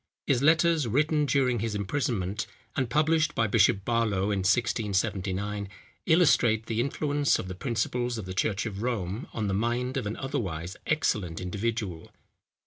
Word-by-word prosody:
His 130 -3 +2
letters, 160 -1 +4
written 150 +5 +2
during 130 -4 +2
his 110 0 -2
imprisonment, 105 -2 -2 0.3
and 130 -4 0
published 155 +3 +2
by 115 - +2
Bishop 100 -1 +3
Barlow 105 -4 +1
in 100 - 0
1679, 100 -1 0 0.4
illustrate 125 -10 +4
the 115 -1 -2
influence 145 +2 +1
of - - -5
the 95 - -5
principles 120 +3 -2
of 110 - -5
the 95 - -5
church 100 +3 0
of 100 -2 -5
Rome 110 -2 -2
on 110 - -3
the 95 - -1
mind 120 +5 -1
of 120 -6 -2
an 105 - -4
otherwise 95 - -3
excellent 105 - 0
individual. 100 -2 -3
115 Hz, 150 wpm, -28 LUFS, 100-130 Hz, 0.4 s, letters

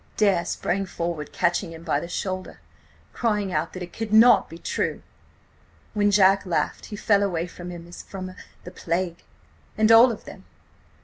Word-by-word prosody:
"Dare 195 -5 +3
sprang 195 +2 -2
forward, 170 -4 -4
catching 175 0 0
him 165 0 -11
by - - 0
the 170 - -6
shoulder–crying 145 - -4
out 155 +2 -1
that 185 - -6
it 175 - -10
could 225 -2 -5
not 225 +3 +6
be 165 - -9
true! - - -3 0.9
When 205 -1 +2
Jack 195 -1 +5
laughed–he 185 +3 -2
fell 205 -1 +2
away 175 -4 0
from 175 0 -9
him 170 -1 -9
as 175 - -10
from–the 185 -1 -10
plague. 170 0 -3 0.6
And 215 +1 +4
all 235 +2 +8
of 220 - -8
them! - - -12
185 Hz, 160 wpm, -24 LUFS, 170-205 Hz, 0.9 s, all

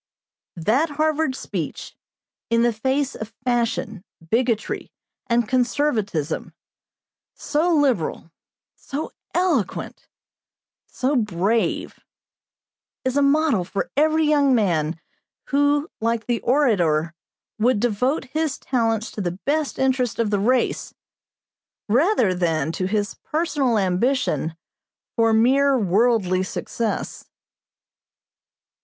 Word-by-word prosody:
'" - - -71
That 225 - +1
Harvard 305 -1 0
speech - - -5 0.5
in 230 0 +3
the 240 -1 +2
face 265 +5 0
of 220 0 -8
fashion, 230 -5 -1 0.3
bigotry, 230 -2 0 0.4
and 235 -1 +2
conservatism 240 - -1 0.8
so 325 +3 +1
liberal, 245 - 0 0.4
so 290 +3 -5 0.2
eloquent, 335 - -1 0.8
so 265 +3 -1
brave 210 0 0 1.1
is 260 0 0
a 285 - +3
model 280 - +3
for 195 +3 -4
every 315 +2 +3
young 285 -3 +4
man, 170 -7 0 0.5
who, 285 +1 +2
like 230 0 -1
the 240 -2 -1
orator, 175 - +2 0.5
would 235 0 +3
devote 245 +6 0
his 310 -3 -1
talents 225 -3 -1
to 210 - -5
the 175 -1 -3
best 300 0 0
interests 260 -3 +1
of 225 -3 0
the 205 - +1
race, 245 +5 0 0.9
rather 245 - +3
than 165 -4 0
to 185 +2 -2
his 205 +1 -1
personal 295 -7 0
ambition 185 - 0 0.6
for 225 -1 +3
mere 265 +5 +4
worldly 200 -2 +2
success. 220 +4 -4
235 Hz, 105 wpm, -22 LUFS, 205-280 Hz, 1.1 s, young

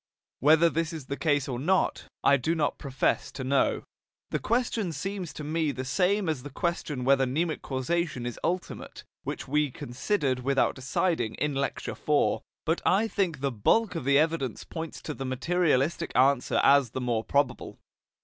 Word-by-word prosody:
Whether 160 +4 +6
this 165 +1 -1
is 155 -5 -6
the 140 - -3
case 145 -3 +1
or 125 -3 -3
not, 185 +8 +1 0.2
I 140 - +6
do 150 +5 0
not 150 -3 0
profess 135 -2 0
to 135 - -5
know. 135 +1 +1 0.5
The - - 0
question 230 -5 0
seems 185 +3 -4
to 150 - -7
me 155 0 0
the 130 -1 -5
same 190 +7 +1
as 155 -5 -1
the 145 - -8
question 150 -3 -2
whether 135 0 +4
mnemic 155 +5 -1
causation 140 0 -2
is 120 - -5
ultimate, 180 +1 -3 0.2
which - - -5
we 150 +1 +1
considered 130 - -1
without 135 +2 +2
deciding 150 -2 -1
in 150 -1 -1
Lecture 135 0 -2
IV. 150 -1 +1 0.3
But 165 +2 0
I 210 +4 +3
think 180 -10 -1
the 140 -1 0
bulk 190 - +2
of 165 - -4
the 140 0 +4
evidence 155 -6 0
points 165 -1 -7
to 155 - -4
the 135 - -6
materialistic 155 +3 +1
answer 130 0 +3
as 140 -3 +5
the 130 - -4
more 120 -3 0
probable. 140 -1 -1
145 Hz, 175 wpm, -28 LUFS, 130-170 Hz, 0.5 s, Whether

